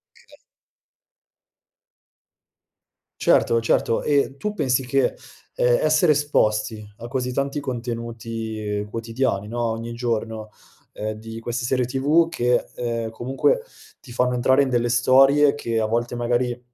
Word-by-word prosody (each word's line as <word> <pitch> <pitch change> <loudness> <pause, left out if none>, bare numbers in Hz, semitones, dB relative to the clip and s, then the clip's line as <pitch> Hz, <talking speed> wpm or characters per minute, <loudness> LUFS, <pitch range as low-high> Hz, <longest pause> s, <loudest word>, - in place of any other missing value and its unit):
Okay. - - -20 2.9
Certo, 115 0 +4
certo, 115 0 +1
e 140 -2 +1
tu 210 +10 -3
pensi 130 -5 +1
che, 135 +1 +1 0.4
ehm, - - +3
essere 175 - +4
esposti 110 -7 0
a 120 - -8
così 125 0 -2
tanti 140 +2 -1
contenuti 115 -4 -4
quotidiani, 115 -2 -2
no, 120 +2 -3
ogni 115 +1 -3
giorno, 110 -2 -3 0.4
ehm, 110 +1 -4
di 115 +1 -8
queste 120 +1 -3
serie 125 0 +1
TV 145 +7 +2
che, 125 -6 +1
ehm, 115 -2 -3
comunque 135 - 0 0.4
ti 125 - -14
fanno 125 +1 +1
entrare 130 +3 +3
in 135 - -2
delle 120 -1 +1
storie 135 +4 +5
che 115 -6 -2
a 110 - +1
volte 120 +2 -1
magari 120 0 0
120 Hz, 130 wpm, -23 LUFS, 115-135 Hz, 2.9 s, storie